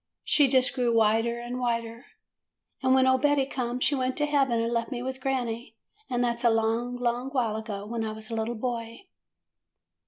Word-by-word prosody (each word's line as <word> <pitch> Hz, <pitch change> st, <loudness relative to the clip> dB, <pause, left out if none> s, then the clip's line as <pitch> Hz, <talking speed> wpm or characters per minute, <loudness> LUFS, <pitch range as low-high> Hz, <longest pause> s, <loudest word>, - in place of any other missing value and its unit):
She 290 Hz, -2 st, +4 dB
just 255 Hz, -1 st, +3 dB
grew 245 Hz, -3 st, +1 dB
whiter 225 Hz, +2 st, +2 dB
and 240 Hz, +1 st, -5 dB
whiter, 230 Hz, 0 st, -2 dB, 0.7 s
and 260 Hz, 0 st, +4 dB
when 260 Hz, 0 st, +5 dB
old 260 Hz, 0 st, +3 dB
Betty 290 Hz, -2 st, +3 dB
come 250 Hz, -2 st, -3 dB
she 290 Hz, -, +2 dB
went 255 Hz, -1 st, -1 dB
to 295 Hz, -, +2 dB
heaven 275 Hz, -5 st, +2 dB
and 230 Hz, +1 st, -1 dB
left 230 Hz, -1 st, -1 dB
me 245 Hz, -1 st, -3 dB
with 260 Hz, 0 st, -5 dB
granny. 240 Hz, -4 st, -2 dB, 0.3 s
And 245 Hz, -1 st, 0 dB
that 235 Hz, -1 st, 0 dB
's -, -, -8 dB
a 235 Hz, -, +6 dB
long, 225 Hz, +2 st, 0 dB
long 245 Hz, +1 st, -1 dB
while 245 Hz, -6 st, 0 dB
ago, 215 Hz, -2 st, -5 dB
when 225 Hz, +1 st, -3 dB
I 220 Hz, -, -2 dB
was 220 Hz, +1 st, -9 dB
a -, -, -2 dB
little 225 Hz, +2 st, -2 dB
boy. 230 Hz, -, -4 dB
240 Hz, 200 wpm, -27 LUFS, 230-260 Hz, 0.7 s, a